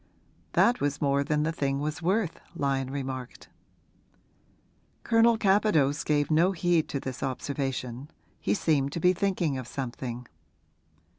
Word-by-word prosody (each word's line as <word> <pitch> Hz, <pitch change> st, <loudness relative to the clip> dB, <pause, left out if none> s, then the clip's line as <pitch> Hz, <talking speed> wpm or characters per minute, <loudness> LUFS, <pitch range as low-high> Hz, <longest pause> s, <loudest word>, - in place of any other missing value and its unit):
'That 240 Hz, +1 st, +3 dB
was 145 Hz, -1 st, 0 dB
more 140 Hz, -1 st, +2 dB
than 150 Hz, +1 st, 0 dB
the 160 Hz, -, 0 dB
thing 140 Hz, -3 st, -1 dB
was 150 Hz, +1 st, -3 dB
worth,' 185 Hz, +1 st, 0 dB, 0.2 s
Lyon 135 Hz, -3 st, -1 dB
remarked. 130 Hz, -2 st, -6 dB, 1.5 s
Colonel 230 Hz, 0 st, +4 dB
Capadose 190 Hz, -9 st, +2 dB
gave 145 Hz, 0 st, +1 dB
no 170 Hz, +5 st, +4 dB
heed 175 Hz, -2 st, +1 dB
to 140 Hz, -, -2 dB
this 130 Hz, -1 st, -6 dB
observation; 135 Hz, -1 st, -3 dB, 0.3 s
he -, -, 0 dB
seemed 140 Hz, -7 st, +1 dB
to -, -, -2 dB
be 180 Hz, +2 st, +4 dB
thinking 175 Hz, -7 st, 0 dB
of 125 Hz, -, -7 dB
something. 125 Hz, -2 st, -5 dB
145 Hz, 135 wpm, -28 LUFS, 135-175 Hz, 1.5 s, Colonel